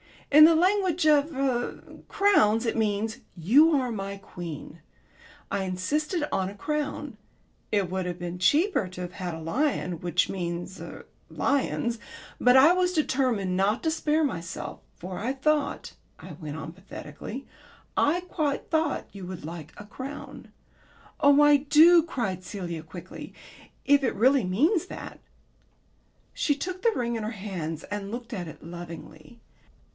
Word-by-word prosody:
In 305 +2 +10
the 330 +1 +6
language 365 -1 +2
of 300 0 +4
er 260 -3 -1 0.2
crowns 235 - +3
it 225 - 0
means 215 0 0 0.2
'You 260 - +5
are 255 -3 0
my 200 -2 -4
queen.' 170 -4 -8 0.7
I 200 -1 0
insisted 295 - -1
on 190 0 0
a 200 - -10
crown. 295 -1 -3 0.5
It 200 -4 +1
would 190 -1 -2
have 175 -1 -4
been 175 0 -5
cheaper 290 - +3
to 180 0 -8
have 180 -1 -5
had 180 -3 -5
a 160 - -8
lion, 180 - -1
which 175 +1 +1
means 175 0 -4
er - - -9 0.2
lions, 235 -4 0 0.4
but 250 +1 +5
I 285 +6 +8
was 365 0 +1
determined 255 - +1
not 200 +4 +1
to 320 - +1
spare 315 0 +1
myself. 170 - -4 0.2
For 180 +1 -7
I 245 +5 -1
thought," 295 +2 0 0.2
I - - -11
went 155 -1 -7
on 160 0 -6
pathetically, 185 - -9 0.5
"I 330 +5 +3
quite 310 -6 -2
thought 315 -3 0
you 195 -3 -8
would 180 -5 -7
like 160 -1 -8
a 205 - -9
crown." 270 +7 -8 0.7
"Oh, 285 +1 +6
I 295 0 +7
do," 310 +5 +6
cried 220 - -3
Celia 175 -4 -5
quickly, 170 +3 -10 0.5
"if 285 0 +5
it 250 - 0
really 260 +1 +4
means 310 - +2
that." - - -8 1.1
She 290 - +1
took 370 +5 -5
the 465 - +4
ring 235 -1 -1
in 220 - -4
her 215 - -2
hands 180 -7 -5
and 205 -1 -4
looked 235 0 -6
at 180 -5 -4
it 155 -1 -11
lovingly. 170 +2 -10
225 Hz, 155 wpm, -27 LUFS, 180-295 Hz, 1.1 s, In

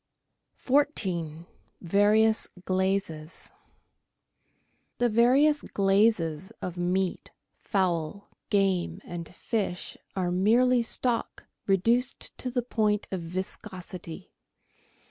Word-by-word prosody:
14— 185 - 0 0.4
VARIOUS 210 +4 +3 0.2
GLAZES 185 -4 -2 1.5
The 245 0 +2
various 265 +7 +4
glazes 195 -4 +1
of 180 -1 -5
meat, 180 +1 -1 0.3
fowl, 185 -1 -1 0.2
game, 195 -3 +1
and 170 -2 -7
fish 200 -6 -3 0.2
are 180 -2 0
merely 235 +7 +4
stock 235 +1 -1 0.2
reduced 230 +7 +1
to 255 - -3
the 245 -1 -1
point 215 -3 0
of 190 -2 -2
viscosity. 180 0 -7
195 Hz, 85 wpm, -28 LUFS, 175-230 Hz, 1.5 s, various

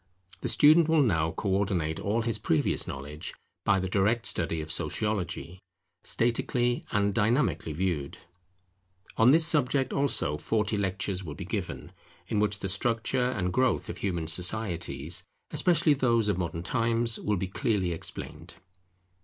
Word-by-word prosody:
The - - -3
student 155 +2 +5
will 160 -2 +4
now 80 - +1
co 100 - -5
ordinate 95 -5 0
all 110 +3 -1
his 115 -2 0
previous 80 -7 0
knowledge 75 +5 -7 0.3
by 100 - +3
the 95 0 -2
direct 105 +5 +1
study 80 -1 0
of 80 0 -5
Sociology, 90 +1 -2 0.4
statically 120 +1 0
and 100 0 +1
dynamically 115 - +1
viewed. 75 -4 -2 1.0
On 110 +2 +6
this 160 +4 +6
subject 135 -4 +2
also 140 - +2
forty 110 +5 -1
lectures 95 -1 -2
will 75 -5 -7
be - - -7
given, - - -5 0.4
in 105 - 0
which 105 -2 0
the 95 - -2
structure 115 +5 0
and 90 -7 -2
growth 130 +2 +1
of - - -6
human 85 -5 -2
societies, 85 -4 0 0.3
especially 165 -3 +3
those 115 -5 +2
of 100 - 0
modern 85 -1 -3
times, 115 +2 +1
will 105 -1 -1
be 95 - -2
clearly 95 -1 -1
explained. 80 - -7
100 Hz, 145 wpm, -28 LUFS, 85-120 Hz, 1.0 s, On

